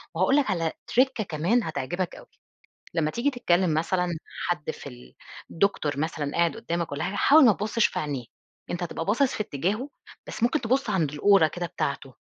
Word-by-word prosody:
وهاقول 185 +11 +3
لك 275 -8 +2
على 165 -3 0 0.2
trick 255 -2 +3
كمان 180 +8 +1
هتعجبك 170 +3 -3
أوي. - - -13 0.7
لمّا 155 -2 +1
تييجي 255 - 0
تتكلّم 180 - +1
مثلًا 180 +3 0 0.4
حد 160 -4 -1
في - - -8
ال 60 0 -14 0.4
الدكتور 160 -6 0
مثلًا 150 -2 -2
قاعد 170 -1 +2
قُدّامك 170 -8 -3
والّا 140 - -2
حاجة، 200 - -3
حاول 300 0 +6
ما 225 - +7
تُبصِّش 215 +3 +1
في - - -5
عينيه، 140 -5 -3 0.5
أنت 175 0 -3
هتبقى 165 -1 -3
باصِص 245 +6 +2
في 215 - -1
اتجاهه، 205 - -2 0.4
بس - - -7
ممكن 250 +5 +2
تبُص 250 0 0
عند 160 -7 0
الأورة 190 +3 +5
كده 175 +2 -4
بتاعته، 140 -4 -4
175 Hz, 180 wpm, -26 LUFS, 155-225 Hz, 0.7 s, ما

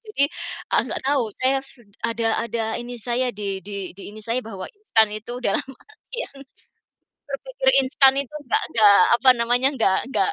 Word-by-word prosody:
jadi, 425 -11 0 0.5
eee, - - +5
gak - - -3
tahu, 275 -1 +2 0.2
saya 265 +1 +1
set 245 -4 -14 0.2
ada 230 0 -1 0.2
ada 230 0 -3 0.2
ini 245 0 -7
saya 245 +2 -1
di 195 -3 -5
di 200 0 -6
di 195 - -13
ini 215 +1 -11
saya 235 +2 -1
bahwa 195 -5 -8 0.2
instan 220 - +3
itu 215 +3 -6
dalam 195 - +1
artian 435 - -9 0.9
berpikir - - -3 0.2
instan 270 0 +5
itu 280 +1 -4
gak - - +2
gak, 210 -3 +6 0.3
apa 260 - +6
namanya, 245 +3 +3
gak 195 -5 +2
gak 410 - +1
240 Hz, 170 wpm, -22 LUFS, 215-270 Hz, 0.9 s, gak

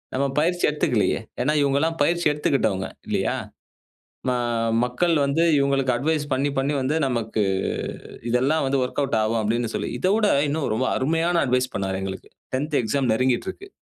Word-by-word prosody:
நம்ம 140 +1 +1
பயிற்சி 175 +3 0
எடுத்துக்கலயே! 120 -8 +1 0.2
ஏன்னா 150 +3 +1
இவுங்க 140 0 +2
எல்லாம் 165 +1 -1
பயிற்சி 170 +2 +1
எடுத்துக்கிட்டவுங்க 135 -10 0 0.2
இல்லயா! - - 0 0.9
ம - - +2 0.5
மக்கள் 165 +8 +1
வந்து 140 +4 +2
இவுங்களுக்கு 135 -2 +2
அட்வைஸ் 150 +3 0
பண்ணி, 140 +2 +1
பண்ணி 140 +2 +1
வந்து 140 +4 0
நமக்கு 115 -3 -1 0.9
இதெல்லாம் 135 +6 +2
வந்து 135 -1 +1
ஒர்க்அவுட் 125 -2 -1
ஆகும் 110 +1 0
அப்பிடின்னு 115 +2 -1
சொல்லி, - - -2
இதவிட 205 +3 +2 0.2
இன்னும் 150 0 -1
ரொம்ப 130 +3 0
அருமையான 165 +5 +1
அட்வைஸ் 125 0 0
பண்ணாரு 95 -1 -2
எங்களுக்கு. 95 0 -6 0.2
10 145 +2 -1
எக்ஸாம் 130 +1 0
நெருங்கிட்டு 130 +7 +1
இருக்கு. 395 - -14
135 Hz, 150 wpm, -23 LUFS, 125-155 Hz, 0.9 s, இவுங்க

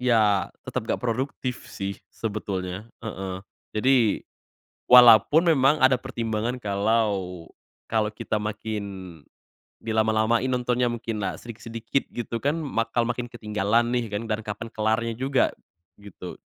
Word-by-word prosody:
iya 110 -5 +3 0.2
tetap - - -4
enggak - - 0
produktif 125 +1 -3
sih 100 0 -4 0.2
sebetulnya, 100 -2 -4 0.2
heeh. 95 -3 -5 0.3
Jadi 120 -1 +3 0.7
walaupun 125 - +8
memang 135 +2 +4
ada 130 -1 +5
pertimbangan 115 -1 -2
kalau 100 -4 0 0.4
kalau 110 -1 0
kita 105 0 -3
makin 100 -5 -5 0.6
di 115 - -3
lama-lamain 110 +2 +2
nontonnya, 125 -1 +1
mungkinlah 115 -3 -3
sedikit-sedikit 115 +2 -4
gitu 115 -1 -3
kan, 145 +5 0
bakal 120 -7 -1
makin 120 +1 -2
ketinggalan 115 0 0
nih 120 -2 0
kan 105 +1 -3
dan 110 -1 -2
kapan 110 +1 -6
kelarnya 110 +1 0
juga 135 0 +2 0.5
gitu. 100 -3 -10
115 Hz, 120 wpm, -25 LUFS, 105-120 Hz, 0.7 s, walaupun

